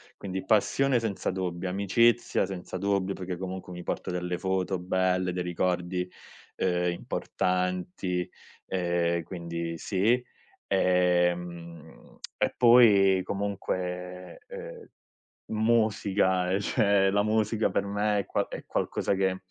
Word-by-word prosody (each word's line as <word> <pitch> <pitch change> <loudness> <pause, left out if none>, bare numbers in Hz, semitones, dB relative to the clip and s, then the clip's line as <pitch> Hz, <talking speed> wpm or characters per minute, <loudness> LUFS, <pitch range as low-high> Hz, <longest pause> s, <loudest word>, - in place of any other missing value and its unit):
Quindi 95 -1 -5
passione 125 +5 +2
senza 105 -4 -2
dubbio, 90 -1 -3
amicizia 100 +6 +2
senza 95 -1 -6
dubbio, 100 0 0
perché 90 -1 -5
comunque 95 0 -6
mi 90 0 -7
porto - - -3
delle 90 0 -2
foto 95 0 -1
belle, 90 0 0
dei 90 0 -2
ricordi, 90 +1 -1 0.5
ehm, 90 -1 +1
importanti, 90 0 -2 0.4
ehm, 85 -2 0
quindi 85 -1 -5
sì. 110 +8 +1 0.4
Ehm, 90 -3 0 0.2
e - - 0
poi 105 -6 +6
comunque, 90 -2 -4
ehm, - - -9 0.6
musica, 105 -5 +2
eh, 95 +1 +1
cioè 100 -3 +3
la 105 +1 +3
musica 110 +1 +1
per - - 0
me 105 +1 0
è 100 - -3
qua - - -1
è - - -7
qualcosa - - -1
che 95 -1 0
95 Hz, 115 wpm, -28 LUFS, 90-100 Hz, 0.6 s, poi